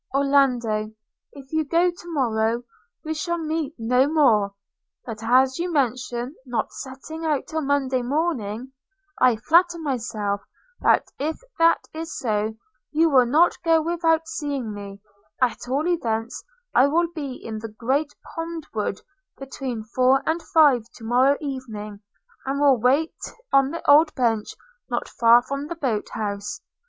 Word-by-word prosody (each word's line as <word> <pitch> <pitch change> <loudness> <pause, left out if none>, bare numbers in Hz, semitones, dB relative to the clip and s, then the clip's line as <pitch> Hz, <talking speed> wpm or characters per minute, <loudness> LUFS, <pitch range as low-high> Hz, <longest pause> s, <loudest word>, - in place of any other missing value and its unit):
Orlando, 250 -6 +2 0.4
if 275 0 -14
you 315 0 +2
go 340 +4 +2
to 345 0 -11
morrow, 235 -4 0 0.4
we 315 - -2
shall 340 +3 -2
meet 315 -2 -3
no 250 +5 +2
more! 220 -10 +3 0.2
– - - -52
but 225 -3 -6
as 260 +4 +3
you 350 +1 -2
mention 250 -2 -1
not 245 -4 -3
setting 275 +5 -8
out 300 -4 0
till 315 0 -3
Monday 270 -3 0
morning, 255 -4 -2 0.5
I 250 -2 +5
flatter 340 +9 +3
myself 225 -9 -2 0.4
that - - +2
if 310 +3 -2 0.2
that 330 0 +4
is 320 +1 -6
so, 215 -2 -1 0.3
you 320 +1 +2
will 255 -3 +5
not 315 +8 +3
go 330 -1 +4
without 325 0 +1
seeing 280 -8 -3
me: 200 0 -9 0.4
at 245 -1 0
all 285 +6 0
events 235 -9 -2 0.3
I 260 - +5
will 335 +4 +2
be 285 -5 -5
in 220 -3 -7
the 225 +1 -7
great 265 +7 -1 0.2
pond 330 -1 -5
wood 210 -3 -2 0.4
between 265 -4 -5
four 255 +4 +2
and 325 +2 0
five 295 -8 +4
to 230 - -13
morrow 255 +5 +3
evening; 225 -8 -6 0.5
and 275 +1 -1
will 280 -4 +4
wait 280 +7 +2 0.4
on 275 -1 +5
the 335 - -7
old 305 +2 +6
bench 225 -4 0 0.3
not - - -2
far 235 0 +5
from 275 +2 -4
the 340 - -5
boat 250 -10 -2
house. 205 -1 -4
265 Hz, 150 wpm, -23 LUFS, 230-315 Hz, 0.5 s, old